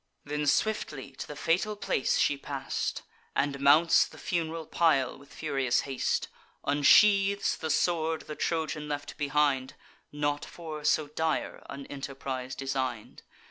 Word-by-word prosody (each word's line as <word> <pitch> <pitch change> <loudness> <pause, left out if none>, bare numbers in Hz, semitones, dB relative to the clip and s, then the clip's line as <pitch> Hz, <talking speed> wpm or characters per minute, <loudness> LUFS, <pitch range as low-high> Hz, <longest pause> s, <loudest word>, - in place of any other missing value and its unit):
Then 150 0 -2
swiftly 150 -8 0
to 135 - -8
the 150 - -7
fatal 175 +8 0
place 200 - 0
she 145 - +3
pass'd, 140 -1 -3 0.3
And 140 0 0
mounts 150 +4 +5
the - - -15
fun'ral 165 -2 -2
pile 150 -5 +2
with 140 +1 -17
furious 135 -5 0
haste; 135 -2 -1 0.4
Unsheathes 195 +7 +5
the 160 - -5
sword 160 0 +1
the 150 - -7
Trojan 155 -2 -2
left 145 -1 -4
behind 145 -3 +1 0.4
(Not 145 0 -1
for 155 -3 -8
so 150 0 +2
dire 160 +1 -2
an 140 0 -7
enterprise 135 -2 -5
design'd). 130 -4 -3
145 Hz, 135 wpm, -29 LUFS, 140-160 Hz, 0.4 s, mounts